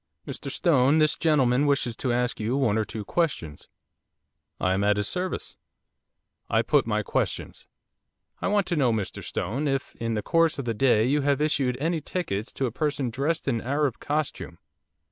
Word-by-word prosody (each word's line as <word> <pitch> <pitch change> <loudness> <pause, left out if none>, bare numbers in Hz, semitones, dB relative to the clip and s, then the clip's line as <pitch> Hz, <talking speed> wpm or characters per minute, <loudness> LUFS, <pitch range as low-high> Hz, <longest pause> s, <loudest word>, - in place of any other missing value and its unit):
'Mr - - -5
Stone, 145 -4 +3
this 155 -1 +3
gentleman 145 -4 +3
wishes 140 -5 +1
to 125 +2 -1
ask 125 +1 0
you 115 +5 0
one 120 -7 +2
or 110 - +2
two 105 0 -7
questions.' 100 - -2 0.9
'I 90 - +1
am 95 +1 0
at 105 0 +3
his 105 0 0
service.' 185 0 -3 0.9
I - - +2
put - - +2
my - - 0
questions. - - -3 0.7
'I - - 0
want 200 -1 +2
to 175 - -1
know, 135 -6 +3
Mr 110 -4 -3
Stone, 130 - -2
if, 135 -2 -2
in 115 -1 -2
the 105 - -2
course 165 +2 +2
of 140 - -4
the 115 - 0
day, 115 -2 +3
you 145 +4 +2
have 140 0 +1
issued 140 -5 +1
any 165 +2 0
tickets 115 - -3
to 135 - -1
a 120 - -2
person 140 -2 -1
dressed 145 +7 -1
in 115 -4 0
Arab 140 0 0
costume? 150 0 -3
135 Hz, 185 wpm, -26 LUFS, 115-150 Hz, 0.9 s, Stone